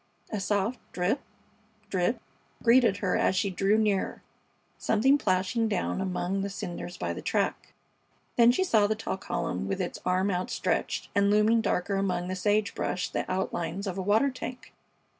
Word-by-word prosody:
A 215 Hz, -, -2 dB
soft 205 Hz, +4 st, 0 dB
drip, 185 Hz, +10 st, 0 dB, 0.7 s
drip 185 Hz, +5 st, +1 dB, 0.4 s
greeted 235 Hz, -4 st, +5 dB
her 185 Hz, -3 st, 0 dB
as -, -, +2 dB
she 195 Hz, +1 st, +1 dB
drew 195 Hz, +3 st, +2 dB
nearer; 210 Hz, -3 st, 0 dB, 0.6 s
something 265 Hz, +6 st, +3 dB
plashing 195 Hz, +3 st, +1 dB
down 195 Hz, -2 st, -1 dB
among 190 Hz, +1 st, -1 dB
the 200 Hz, -, -2 dB
cinders 175 Hz, -2 st, -6 dB
by 85 Hz, -1 st, -2 dB
the -, -, -6 dB
track. -, -, -1 dB, 0.6 s
Then 235 Hz, 0 st, +7 dB
she 375 Hz, -, +1 dB
saw 220 Hz, -, +3 dB
the 215 Hz, -, 0 dB
tall 215 Hz, -3 st, -3 dB
column 95 Hz, -, -3 dB
with 95 Hz, -, -2 dB
its -, -, -3 dB
arm 185 Hz, +2 st, +1 dB
outstretched, 180 Hz, 0 st, -1 dB
and 200 Hz, 0 st, +3 dB
looming 215 Hz, +2 st, +4 dB
darker 195 Hz, -1 st, 0 dB
among 180 Hz, -2 st, -1 dB
the 185 Hz, -, -2 dB
sage 205 Hz, +2 st, +1 dB
brush 180 Hz, -, -2 dB
the -, -, -2 dB
outlines 185 Hz, 0 st, -2 dB
of 190 Hz, -3 st, -3 dB
a 195 Hz, -, -2 dB
water 220 Hz, +8 st, +3 dB
tank. 250 Hz, -2 st, -8 dB
200 Hz, 165 wpm, -28 LUFS, 185-220 Hz, 0.7 s, Then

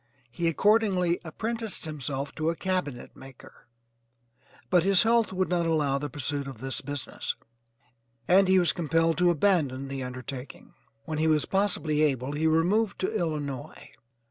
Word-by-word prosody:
He 170 Hz, +6 st, -1 dB
accordingly 185 Hz, 0 st, +2 dB
apprenticed 220 Hz, +6 st, -4 dB
himself 140 Hz, -2 st, -4 dB
to 155 Hz, +1 st, -1 dB
a 170 Hz, -, -1 dB
cabinet 180 Hz, -9 st, -3 dB
maker, 135 Hz, -1 st, -15 dB, 1.0 s
but 180 Hz, -1 st, +5 dB
his 195 Hz, +1 st, +4 dB
health 230 Hz, -1 st, +3 dB
would 185 Hz, 0 st, 0 dB
not 175 Hz, -2 st, 0 dB
allow 145 Hz, -4 st, +1 dB
the 145 Hz, +1 st, -4 dB
pursuit 145 Hz, +1 st, -3 dB
of 135 Hz, -, -8 dB
this 130 Hz, +3 st, -4 dB
business, 145 Hz, 0 st, -4 dB, 0.9 s
and 190 Hz, +2 st, +5 dB
he 190 Hz, 0 st, +5 dB
was 175 Hz, -2 st, +3 dB
compelled 165 Hz, -1 st, +1 dB
to 180 Hz, 0 st, +4 dB
abandon 150 Hz, -7 st, +1 dB
the 135 Hz, -1 st, -4 dB
undertaking. 130 Hz, +1 st, -8 dB, 0.3 s
When 155 Hz, -1 st, -3 dB
he 160 Hz, -, +2 dB
was 155 Hz, -2 st, +3 dB
possibly 180 Hz, -6 st, +1 dB
able 135 Hz, -3 st, +1 dB
he 155 Hz, +2 st, 0 dB
removed 190 Hz, +7 st, +2 dB
to 190 Hz, -, -1 dB
Illinois. 150 Hz, -, -4 dB
160 Hz, 150 wpm, -27 LUFS, 140-185 Hz, 1.0 s, but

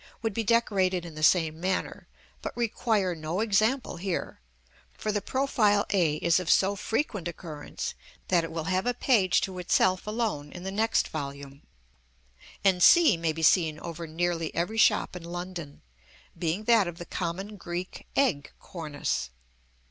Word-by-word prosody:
would 225 Hz, -2 st, -1 dB
be 225 Hz, -, -1 dB
decorated 195 Hz, -6 st, +2 dB
in 165 Hz, -, -9 dB
the 155 Hz, -, -8 dB
same 160 Hz, 0 st, +3 dB
manner, 185 Hz, +2 st, -2 dB, 0.3 s
but -, -, -6 dB
require 220 Hz, -5 st, 0 dB
no 160 Hz, +3 st, -4 dB
example 220 Hz, +3 st, +1 dB
here, 180 Hz, -, -4 dB, 0.6 s
for 215 Hz, -, -2 dB
the 205 Hz, -1 st, -1 dB
profile 215 Hz, -5 st, +2 dB
a 170 Hz, -7 st, +2 dB
is 170 Hz, +3 st, +2 dB
of 180 Hz, -, -4 dB
so 195 Hz, +1 st, +4 dB
frequent 210 Hz, -, -2 dB
occurrence 160 Hz, -3 st, -6 dB, 0.3 s
that 175 Hz, -2 st, +3 dB
it 165 Hz, -, -5 dB
will 165 Hz, -1 st, -3 dB
have 185 Hz, +6 st, 0 dB
a 245 Hz, -, +1 dB
page 210 Hz, -9 st, +3 dB
to 185 Hz, -1 st, -4 dB
itself 185 Hz, +2 st, +2 dB
alone 210 Hz, -10 st, -2 dB
in 175 Hz, -, -8 dB
the 190 Hz, -, -4 dB
next 220 Hz, +3 st, +1 dB
volume; 140 Hz, -1 st, -6 dB, 1.0 s
and 190 Hz, -2 st, +3 dB
c 330 Hz, -, +7 dB
may 165 Hz, -1 st, 0 dB
be 160 Hz, +1 st, -5 dB
seen 160 Hz, -2 st, +4 dB
over 170 Hz, 0 st, -6 dB
nearly 165 Hz, 0 st, -1 dB
every 210 Hz, +7 st, -1 dB
shop -, -, +3 dB
in 180 Hz, -, -7 dB
London, 175 Hz, -3 st, -7 dB, 0.5 s
being 170 Hz, +4 st, -2 dB
that 225 Hz, -4 st, +4 dB
of 170 Hz, -1 st, -6 dB
the 175 Hz, -, -7 dB
common 185 Hz, +6 st, -4 dB
Greek 175 Hz, -1 st, -6 dB
egg 205 Hz, -, +1 dB
cornice.) 150 Hz, -, -4 dB
180 Hz, 160 wpm, -28 LUFS, 165-210 Hz, 1.0 s, c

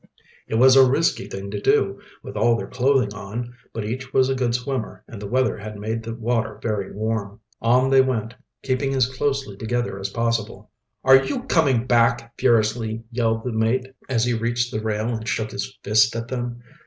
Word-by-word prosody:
It -, -, -2 dB
was 130 Hz, +3 st, +6 dB
a 135 Hz, -, +9 dB
risky 165 Hz, +7 st, +1 dB
thing 100 Hz, +1 st, -6 dB
to 100 Hz, -1 st, -4 dB
do, -, -, +2 dB, 0.2 s
with -, -, -9 dB
all 115 Hz, +3 st, +3 dB
their -, -, -4 dB
clothing 125 Hz, -4 st, +1 dB
on, 110 Hz, +4 st, -6 dB, 0.2 s
but 110 Hz, -2 st, -4 dB
each 130 Hz, +4 st, -5 dB
was 130 Hz, 0 st, +4 dB
a -, -, +2 dB
good 125 Hz, -3 st, 0 dB
swimmer 125 Hz, -1 st, -4 dB
and 105 Hz, -, -10 dB
the 100 Hz, -, -5 dB
weather 130 Hz, 0 st, +1 dB
had 105 Hz, 0 st, -7 dB
made 110 Hz, +2 st, -3 dB
the 115 Hz, 0 st, -6 dB
water 115 Hz, -2 st, -1 dB
very 105 Hz, -4 st, -2 dB
warm. 110 Hz, 0 st, -3 dB, 0.2 s
On 125 Hz, +3 st, +3 dB
they 135 Hz, 0 st, +7 dB
went, 115 Hz, -4 st, -1 dB, 0.3 s
keeping 135 Hz, +1 st, 0 dB
as 130 Hz, -2 st, +4 dB
closely 135 Hz, -3 st, -2 dB
together 115 Hz, -1 st, -2 dB
as 95 Hz, +1 st, -3 dB
possible. 115 Hz, -2 st, -2 dB, 0.3 s
"Are 135 Hz, 0 st, +7 dB
you 255 Hz, -, -3 dB
coming 140 Hz, -, +2 dB
back?" 115 Hz, -1 st, +2 dB
furiously 115 Hz, -1 st, +1 dB
yelled 115 Hz, -2 st, 0 dB
the 125 Hz, -, -3 dB
mate, 120 Hz, +4 st, 0 dB, 0.2 s
as 120 Hz, -3 st, +1 dB
he 120 Hz, -, +1 dB
reached 120 Hz, +1 st, -1 dB
the 110 Hz, -, -2 dB
rail 110 Hz, 0 st, -1 dB
and 110 Hz, -2 st, -4 dB
shook 110 Hz, -2 st, -1 dB
his 100 Hz, -, -5 dB
fist 110 Hz, +3 st, +3 dB
at 115 Hz, +1 st, -4 dB
them. 120 Hz, -1 st, -4 dB
115 Hz, 195 wpm, -23 LUFS, 110-130 Hz, 0.3 s, a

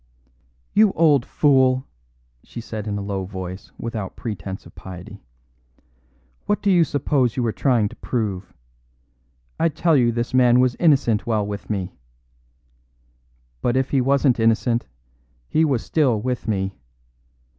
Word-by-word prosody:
"You 210 Hz, -2 st, +5 dB
old 150 Hz, -6 st, +3 dB
fool!" 130 Hz, -3 st, +3 dB, 0.6 s
she -, -, -9 dB
said 110 Hz, -2 st, -6 dB
in 105 Hz, -1 st, -2 dB
a 100 Hz, -, -4 dB
low 100 Hz, -1 st, -3 dB
voice 95 Hz, 0 st, -7 dB
without 110 Hz, -5 st, -5 dB
pretence 95 Hz, -4 st, -6 dB
of -, -, -15 dB
piety, 90 Hz, -2 st, -10 dB, 1.3 s
"what 205 Hz, -, +1 dB
do 200 Hz, -, +3 dB
you 175 Hz, -2 st, +5 dB
suppose 140 Hz, -5 st, 0 dB
you 125 Hz, -, +1 dB
are 115 Hz, -, +1 dB
trying 120 Hz, -3 st, +1 dB
to -, -, -13 dB
prove? 100 Hz, -6 st, -3 dB, 1.1 s
I 165 Hz, -, +3 dB
tell 160 Hz, +1 st, +1 dB
you 120 Hz, -3 st, +3 dB
this 120 Hz, +2 st, -3 dB
man 125 Hz, -1 st, +5 dB
was 125 Hz, -1 st, +3 dB
innocent 135 Hz, -11 st, +3 dB
while 110 Hz, -3 st, +1 dB
with 100 Hz, 0 st, -6 dB
me. 95 Hz, -3 st, -3 dB, 1.7 s
But 120 Hz, +1 st, +1 dB
if 130 Hz, 0 st, 0 dB
he 135 Hz, -, +3 dB
wasn't 135 Hz, -1 st, +2 dB
innocent, 115 Hz, +1 st, +1 dB, 0.6 s
he 160 Hz, -, +2 dB
was 135 Hz, -7 st, 0 dB
still 135 Hz, -9 st, +2 dB
with 125 Hz, +2 st, -3 dB
me. 95 Hz, -4 st, -2 dB
120 Hz, 145 wpm, -22 LUFS, 105-135 Hz, 1.7 s, You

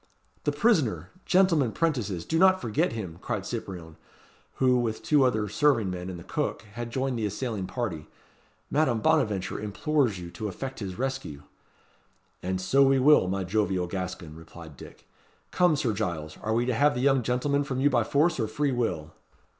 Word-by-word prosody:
"The 145 Hz, -, +2 dB
prisoner! 145 Hz, -, +1 dB, 0.2 s
gentlemen 170 Hz, -, +3 dB
'prentices 115 Hz, -, -1 dB
do 160 Hz, -, 0 dB
not 185 Hz, 0 st, +5 dB
forget 115 Hz, -, 0 dB
him!" 90 Hz, -7 st, -6 dB
cried -, -, -3 dB
Cyprien, 85 Hz, -4 st, -6 dB, 0.6 s
who, 125 Hz, -1 st, +3 dB
with 115 Hz, -2 st, -2 dB
two 150 Hz, -3 st, +4 dB
other 110 Hz, -5 st, +1 dB
serving 115 Hz, -3 st, +2 dB
men 90 Hz, 0 st, -5 dB
and 90 Hz, -, -6 dB
the 85 Hz, -, -10 dB
cook, -, -, -3 dB
had 120 Hz, +1 st, -5 dB
joined 130 Hz, 0 st, -2 dB
the 110 Hz, -, -1 dB
assailing 105 Hz, -2 st, -3 dB
party. 95 Hz, -12 st, -4 dB, 0.6 s
"Madame 135 Hz, -6 st, +2 dB
Bonaventure 110 Hz, -12 st, +1 dB
implores 115 Hz, -, 0 dB
you 85 Hz, -1 st, -8 dB
to 110 Hz, -, -5 dB
effect 135 Hz, +7 st, -6 dB
his 95 Hz, -4 st, -5 dB
rescue." 130 Hz, -, -4 dB, 1.0 s
"And 95 Hz, 0 st, -2 dB
so 135 Hz, +9 st, +2 dB
we 135 Hz, 0 st, +5 dB
will, 135 Hz, -6 st, +5 dB
my 95 Hz, +1 st, -1 dB
jovial 95 Hz, -1 st, 0 dB
Gascon," 90 Hz, -3 st, -5 dB
replied 80 Hz, -1 st, -12 dB
Dick. -, -, -14 dB, 0.4 s
"Come, 180 Hz, -3 st, +3 dB
Sir 130 Hz, -6 st, 0 dB
Giles! 85 Hz, -7 st, -3 dB
are 110 Hz, +1 st, -1 dB
we 120 Hz, +1 st, +1 dB
to 125 Hz, -, 0 dB
have 145 Hz, +5 st, +3 dB
the 125 Hz, -, -2 dB
young 135 Hz, -1 st, +3 dB
gentleman 135 Hz, +4 st, 0 dB
from 130 Hz, -2 st, -3 dB
you 145 Hz, +2 st, +3 dB
by 120 Hz, -3 st, +3 dB
force 150 Hz, +5 st, +1 dB
or 110 Hz, -, 0 dB
free 140 Hz, +6 st, -1 dB
will?" 95 Hz, -11 st, -2 dB
115 Hz, 180 wpm, -27 LUFS, 95-140 Hz, 1.0 s, not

